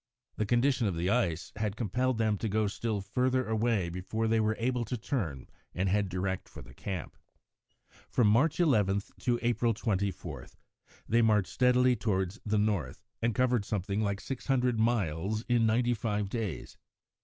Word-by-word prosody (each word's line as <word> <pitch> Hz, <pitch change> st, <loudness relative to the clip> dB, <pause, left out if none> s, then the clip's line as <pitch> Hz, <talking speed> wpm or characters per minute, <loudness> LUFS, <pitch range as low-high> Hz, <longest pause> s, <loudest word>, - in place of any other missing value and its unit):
The 110 Hz, -, -1 dB
condition 120 Hz, 0 st, +2 dB
of 95 Hz, -, -1 dB
the 90 Hz, +4 st, 0 dB
ice 90 Hz, -9 st, 0 dB
had 105 Hz, -2 st, -1 dB
compelled 125 Hz, +3 st, 0 dB
them 110 Hz, -2 st, +2 dB
to 110 Hz, -, -2 dB
go 110 Hz, +1 st, +1 dB
still 105 Hz, 0 st, -2 dB
further 130 Hz, +4 st, 0 dB
away 110 Hz, -4 st, +1 dB
before 95 Hz, +6 st, -2 dB
they 110 Hz, 0 st, +2 dB
were 110 Hz, 0 st, +1 dB
able 125 Hz, +1 st, 0 dB
to 125 Hz, -, -3 dB
turn 95 Hz, -, -3 dB, 0.3 s
and 95 Hz, +2 st, 0 dB
head 100 Hz, 0 st, +1 dB
direct 95 Hz, +1 st, -3 dB
for -, -, -10 dB
the -, -, -14 dB
camp. 95 Hz, -6 st, -5 dB, 0.9 s
From 120 Hz, -, +2 dB
March 130 Hz, +12 st, +3 dB
11 105 Hz, -, +3 dB, 0.2 s
to 120 Hz, -1 st, +1 dB
April 120 Hz, -1 st, +1 dB
24 95 Hz, -, -3 dB, 0.6 s
they 115 Hz, +1 st, +3 dB
marched 105 Hz, -4 st, +2 dB
steadily 125 Hz, 0 st, +4 dB
towards 95 Hz, -2 st, -1 dB
the 105 Hz, 0 st, 0 dB
north, 100 Hz, -7 st, -1 dB, 0.2 s
and 115 Hz, -1 st, +1 dB
covered 125 Hz, -4 st, +2 dB
something 100 Hz, 0 st, -2 dB
like 100 Hz, -2 st, -1 dB
six 135 Hz, -2 st, -6 dB
hundred 125 Hz, -4 st, +2 dB
miles 105 Hz, -2 st, 0 dB
in 120 Hz, -2 st, +3 dB
ninety 120 Hz, +2 st, +2 dB
five 105 Hz, -3 st, -2 dB
days. 105 Hz, -, -4 dB
110 Hz, 165 wpm, -30 LUFS, 100-120 Hz, 0.9 s, steadily